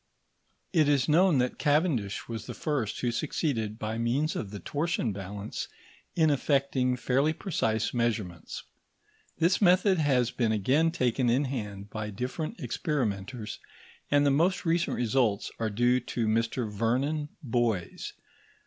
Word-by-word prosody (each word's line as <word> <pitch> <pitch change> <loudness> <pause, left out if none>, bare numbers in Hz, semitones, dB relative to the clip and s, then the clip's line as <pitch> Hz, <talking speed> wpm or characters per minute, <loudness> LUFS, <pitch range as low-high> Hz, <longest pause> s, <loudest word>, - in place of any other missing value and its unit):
It 155 -4 +4
is 140 -3 +3
known 170 +1 +5
that 125 0 0
Cavendish 145 - +1
was 115 -2 -6
the - - -6
first 130 -8 -2
who 120 - +1
succeeded 115 -5 -1
by 110 +1 -3
means 135 +7 0
of 105 - -3
the 100 0 -7
torsion 145 - -1
balance 100 +2 -5 0.5
in 160 -2 +4
effecting 135 -2 +1
fairly 135 +5 +2
precise 110 - -1
measurements. 110 -8 -2 0.7
This 170 +5 +2
method 185 0 +5
has 130 -6 +2
been 115 -3 0
again 130 +10 +3
taken 125 -4 +1
in 130 +5 +2
hand 105 -6 -5
by 110 -1 -4
different 125 - -4
experimenters, 120 - -2 0.5
and 145 0 +4
the 140 - +4
most 170 +8 +2
recent 170 +1 +1
results 115 -3 +1
are 110 -1 0
due 120 +4 +3
to 120 -1 -2
Mr 115 +2 0
Vernon 130 +8 0
Boys. 115 -7 -1
125 Hz, 140 wpm, -29 LUFS, 110-150 Hz, 0.7 s, known